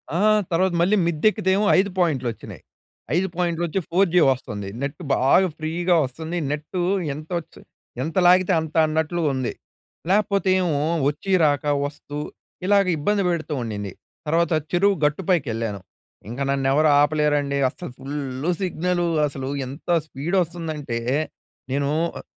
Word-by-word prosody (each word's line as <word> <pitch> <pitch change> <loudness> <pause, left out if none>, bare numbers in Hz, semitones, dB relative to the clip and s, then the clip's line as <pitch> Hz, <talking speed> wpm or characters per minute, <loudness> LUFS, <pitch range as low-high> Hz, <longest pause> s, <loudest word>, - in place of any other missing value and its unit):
ఆ! - - +1 0.3
తర్వాత 180 +2 +2
మళ్ళీ 195 +5 +3
మిద్ద 160 -3 -3
ఎక్కితే 210 -3 -2
ఏమో, 210 - +1
5 200 - +1
పాయింట్లు 150 -8 +1
వచ్చినాయి. - - -11 0.5
5 185 +2 +2
పాయింట్లోచ్చి 175 0 -1
4జీ 180 0 +3
వస్తుంది 105 -6 -4
నెట్ 140 +4 -4
బాగా 140 +10 +4
ఫ్రీగా 170 +3 0
వస్తుంది. 160 +7 -5
నెట్టు 150 +5 -4 0.3
ఎం‌తోచి 160 +3 -6 0.4
ఎంత 160 +1 -5
లాగితే 185 +1 +5
అంత 160 -1 -8
అన్నట్లుగా 160 0 0
ఉంది. 130 -2 -2 0.6
లేకపోతే, 200 -1 +2
ఏమో 155 -5 0 0.3
వచ్చి 150 +6 -5
రాక 145 -2 +2 0.2
వస్తూ 145 0 -7 0.5
ఇలాగ 200 0 +4
ఇబ్బంది 200 +6 +1
పెడుతూ 160 -2 -2
ఉండింది. 105 -4 -4 0.4
తర్వాత 165 +1 +2 0.2
చెరువు 195 +3 +3
గట్టుపైకెళ్ళాను. 135 - -1 0.5
ఇంక 120 - -6
నన్నెవరు 140 +3 +2
ఆపలేరండి, 145 -1 +1
అస్సలు 155 +1 -9
ఫుల్లు 140 +2 -3
సిగ్నలు 175 -1 0 0.2
అసలు 135 -1 -5 0.2
ఎంత 140 +7 -10 0.2
స్పీడ్ 160 +5 -3
వస్తుందంటే, 155 -7 -4 0.7
నేను 140 +1 0 0.3
ఆహ్ - - -10
155 Hz, 130 wpm, -23 LUFS, 140-180 Hz, 0.7 s, లాగితే